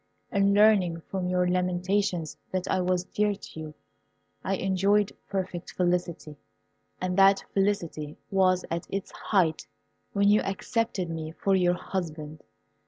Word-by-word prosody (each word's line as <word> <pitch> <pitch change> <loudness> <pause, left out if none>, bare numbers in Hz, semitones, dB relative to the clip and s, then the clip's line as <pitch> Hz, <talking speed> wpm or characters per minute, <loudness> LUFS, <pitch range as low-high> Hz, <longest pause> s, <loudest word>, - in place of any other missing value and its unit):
In 200 0 +3
learning 200 -6 +4
from 185 -2 -2
your 180 0 +2
lamentations 180 -1 0 0.2
that 185 -1 -2
I 185 - +1
was 180 0 +1
dear 205 +2 0
to 190 - -11
you, 155 -1 -7 0.7
I 195 - 0
enjoyed 195 +2 +2 0.2
perfect 185 -3 -4
felicity, 175 -4 -1 0.6
and 180 0 -1
that 195 0 +6
felicity 170 -7 -1
was 185 -2 +3
at 170 0 -3
its 195 -1 -4
height 175 -6 0 0.5
when 200 0 +3
you 210 +1 +5
accepted 205 -1 -2
me 160 -1 -5
for 195 +3 +1
your 180 -1 +3
husband. 155 -5 -5
185 Hz, 135 wpm, -27 LUFS, 175-195 Hz, 0.7 s, that